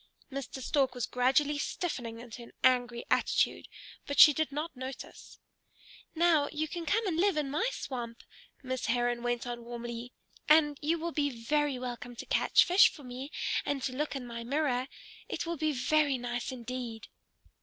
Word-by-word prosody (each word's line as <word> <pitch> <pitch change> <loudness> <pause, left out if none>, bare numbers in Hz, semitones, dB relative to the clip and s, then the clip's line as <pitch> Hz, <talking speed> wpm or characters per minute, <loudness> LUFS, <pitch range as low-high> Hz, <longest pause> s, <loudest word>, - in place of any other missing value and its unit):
Mr. 265 -1 -5
Stork 265 -3 +1
was 245 -1 -1
gradually 270 +4 +2
stiffening 245 -9 -3
into 240 0 -9
an 235 - -13
angry 245 -2 +2
attitude, - - +2 0.4
but 285 - -1
she 300 - +11
did 315 0 -1
not 300 +3 -4
notice. 260 0 -8 0.8
"Now 320 -3 +3
you 310 +1 -2
can 335 +1 -6
come 445 +5 +2
and 350 -5 -1
live 380 -1 +3
in 285 -3 -1
my 320 - +1
swamp," 240 - -6 0.4
Miss 260 -1 -3
Heron 240 0 +1
went 240 0 -1
on 240 -1 -5
warmly, 235 0 -6 0.4
"and 295 -2 +5
you 320 +3 +1
will 335 +1 -3
be 290 -2 +1
very 280 +3 0
welcome 245 -1 -6
to - - -7
catch - - +4
fish 360 +3 +6
for 295 - -13
me, 255 +2 -7 0.3
and 280 -2 -2
to 255 - -2
look 295 +1 -2
in 265 -2 -4
my 235 -1 -6
mirror. 260 -1 0 0.4
It - - -3
will 340 0 -2
be 310 +1 +1
very 285 +1 +2
nice 245 0 -3
indeed!" 245 -2 -6
260 Hz, 175 wpm, -31 LUFS, 245-300 Hz, 0.8 s, she